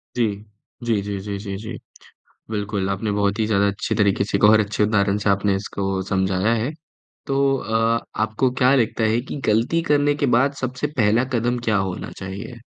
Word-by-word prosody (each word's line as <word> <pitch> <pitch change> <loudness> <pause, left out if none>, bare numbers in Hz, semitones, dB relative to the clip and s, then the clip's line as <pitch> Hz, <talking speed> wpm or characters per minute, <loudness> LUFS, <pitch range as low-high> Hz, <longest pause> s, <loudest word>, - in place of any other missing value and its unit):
जी। 120 -2 +2 0.6
जी, 115 -4 +1
जी, 100 0 -4
जी, 100 0 -5
जी, 100 -1 -5
जी। 110 +2 -7 0.8
बिल्कुल, 105 -2 -2
आपने 100 +2 -2
बहुत 100 +1 0
ही 110 - +2
ज़्यादा 100 -2 +2
अच्छी 100 +2 -2
तरीके 100 -2 +2
से 100 0 -1
एक - - -5
और 110 +1 +7
अच्छे 105 0 0
उदाहरण 100 -1 +2
से 105 0 0
आपने 100 0 +2
इसको 95 -1 -3
समझाया 95 +3 +1
है। 130 - -2 0.6
तो 135 - -1 0.2
अ, 115 +1 +1 0.2
आपको 110 +4 +1
क्या 130 +1 +5
लगता 115 -2 +1
है 115 - +2
कि - - -3
ग़लती 115 +10 +2
करने 145 -2 +2
के 145 0 0
बाद 140 +3 +3
सबसे 130 +2 -2
पहला 115 +1 +3
कदम 120 +1 0
क्या 110 -2 +2
होना 95 -2 -3
चाहिए? 95 +5 -7
105 Hz, 190 wpm, -22 LUFS, 100-115 Hz, 0.8 s, और